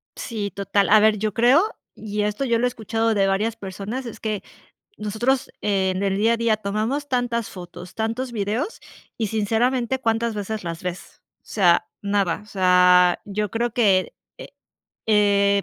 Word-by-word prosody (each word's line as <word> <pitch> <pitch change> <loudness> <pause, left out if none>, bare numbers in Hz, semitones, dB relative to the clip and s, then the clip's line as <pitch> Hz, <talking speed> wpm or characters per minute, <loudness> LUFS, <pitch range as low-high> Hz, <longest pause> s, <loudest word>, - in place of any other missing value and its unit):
Sí, 210 -4 -4
total, 200 -1 0
a 215 0 +7
ver, 215 0 +4
yo 215 0 -2
creo, 250 - +5 0.3
y 210 -1 -4
esto 210 +6 -1
yo 235 -2 +1
lo 245 - +2
he - - +4
escuchado 225 -1 -1
de 195 -1 +3
varias 210 +4 0
personas, 205 +5 -6
es 235 - -8
que 215 -2 -3 0.5
nosotros 235 +6 -1
en 190 -2 0
el 195 -1 0
día 225 +3 +3
a 235 - 0
día 230 -2 +1
tomamos 215 +8 -2
tantas 245 -4 -1
fotos, 180 -1 -10
tantos 230 +3 -2
videos 225 - -2 0.4
y 225 - -1
sinceramente, 235 +4 0
¿cuántas 230 -1 0
veces 210 +1 -4
las 170 0 -6
ves? 180 0 -7 0.2
O - - -48
sea, 180 -5 +3
nada, 200 -3 0
o - - -19
sea, 180 -2 +4
yo 210 0 -2
creo 235 +3 -1
que, 200 -5 +2 0.2
eh - - -10 0.6
eh, 200 -2 +3
210 Hz, 170 wpm, -23 LUFS, 200-230 Hz, 0.6 s, a